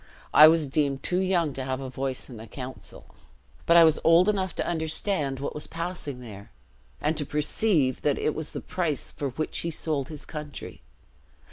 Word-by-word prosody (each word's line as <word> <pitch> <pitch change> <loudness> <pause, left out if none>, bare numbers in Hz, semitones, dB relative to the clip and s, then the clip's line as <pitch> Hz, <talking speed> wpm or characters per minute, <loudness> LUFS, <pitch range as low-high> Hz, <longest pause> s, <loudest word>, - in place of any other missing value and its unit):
I 155 - +10
was 160 -1 +4
deemed 140 -1 -1
too 180 - 0
young 180 -6 +1
to 130 - -4
have 130 0 -2
a 135 - -5
voice 130 0 -4
in 125 - -10
the 110 +1 -10
council; 125 -5 -9 0.6
but 170 - +7
I 170 - +9
was 160 -2 +4
old 170 +3 +6
enough 190 -4 0
to - - -2
understand 160 -3 -1
what 140 - -3
was 150 - -4
passing 165 -6 -5
there, 100 -4 -10 0.5
and 155 +2 0
to 150 - +1
perceive, 150 - +1
that 145 -2 +1
it 155 - 0
was 155 -1 -4
the - - -4
price 160 -7 -2
for 140 - -3
which 155 +5 -3
he 170 - -2
sold 150 -4 -2
his 150 -2 -8
country. 150 -2 -8
150 Hz, 195 wpm, -26 LUFS, 135-165 Hz, 0.6 s, I